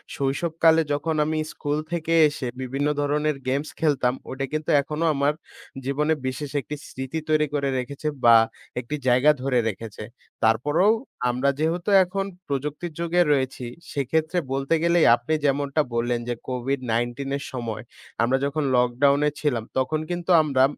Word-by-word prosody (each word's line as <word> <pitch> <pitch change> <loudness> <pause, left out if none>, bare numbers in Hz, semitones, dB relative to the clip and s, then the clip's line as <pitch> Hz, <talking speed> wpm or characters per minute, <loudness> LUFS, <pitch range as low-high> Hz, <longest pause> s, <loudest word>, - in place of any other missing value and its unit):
শৈশবকালে 160 +4 +2
যখন 155 +2 -1
আমি 155 +1 -1 0.2
স্কুল 145 0 -2
থেকে 165 -1 -1 0.2
এসে 145 -3 -5
বিভিন্ন 135 +3 -1
ধরণের 150 +1 0
গেমস 140 +4 -1
খেলতাম, 135 -6 +2 0.2
ওইটা 135 +1 -3
কিন্তু 155 0 -2
এখনো 150 +3 -3
আমার 140 +1 +1 0.5
জীবনে 150 +3 +1
বিশেষ 130 +2 -4
একটি 150 - -6
স্মৃতি 130 +5 -5
তৈরি 155 0 +3
করে 140 -1 0
রেখেছে 135 +4 -4 0.2
বা 115 -1 +8 0.4
একটি 125 +4 -4
জায়গা 130 +4 +5
ধরে 130 -2 +1
রেখেছে। 110 0 -7 0.4
তারপরও 145 - +3 0.4
আমরা 125 +3 +1
যেহেতু 170 +4 0
এখন 195 +2 -3 0.2
প্রযুক্তির 150 +5 -3
যুগে 170 +1 +2
রয়েছি 130 -3 0 0.3
সেক্ষেত্রে 155 +5 -1 0.2
বলতে 135 +3 0
গেলেই 170 -1 +4
আপনি 120 +6 -3
যেমনটা 140 +2 +1
বললেন 120 +1 0
যে, 120 - 0
কোভিড-১৯ 125 0 -2
এর 140 - -7
সময় 115 -4 -4 0.4
আমরা 125 +3 +2
যখন 145 +1 -1
লকডাউনে 140 +4 +3
ছিলাম 125 -7 0
তখন 145 +4 +1
কিন্তু 175 +1 -2
আমরা 135 -3 +2
140 Hz, 145 wpm, -24 LUFS, 130-155 Hz, 0.5 s, বা